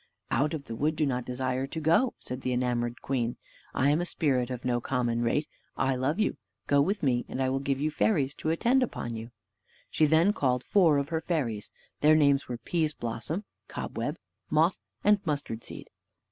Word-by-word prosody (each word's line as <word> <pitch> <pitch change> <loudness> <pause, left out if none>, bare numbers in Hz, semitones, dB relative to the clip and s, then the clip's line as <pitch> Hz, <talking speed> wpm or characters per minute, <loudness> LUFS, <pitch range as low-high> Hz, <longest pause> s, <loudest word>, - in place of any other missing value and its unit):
"Out 150 +5 +1
of 140 -3 -7
the 115 - -6
wood 150 +6 0
do 155 - +1
not 125 -3 -1
desire 130 +1 -2
to 160 - -5
go," 165 +11 +3
said 125 +1 -6
the 130 - -1
enamored 120 -1 -1
queen. 120 -3 -1 0.4
"I 140 +2 +3
am 155 +4 +2
a - - -1
spirit 130 -8 +1
of 125 -1 -5
no 120 -1 +1
common 120 -2 0
rate. 135 +6 +1 0.3
I 135 0 +1
love 135 +8 0
you. 215 - +1 0.3
Go 140 0 +4
with 195 +7 0
me, 125 -3 +2
and - - -4
I 130 -1 +2
will 135 +1 0
give 135 -1 -1
you 155 +2 0
fairies 145 -6 +1
to 155 - -2
attend 240 +11 +3
upon 120 - -2
you." 115 +1 -6 0.6
She 155 - +3
then 165 +7 +4
called 130 - +1
four 170 -7 +4
of 140 +1 -1
her 160 -1 -1
fairies: 125 -12 -2 0.3
their 155 +1 +6
names 140 -2 +3
were, 120 - -4
Pease 155 +5 -1
blossom, 120 - -3 0.2
Cobweb, - - -4 0.3
Moth, - - +3 0.2
and 210 0 +5
Mustard 140 - -3
seed. - - -9
140 Hz, 200 wpm, -28 LUFS, 125-155 Hz, 0.6 s, their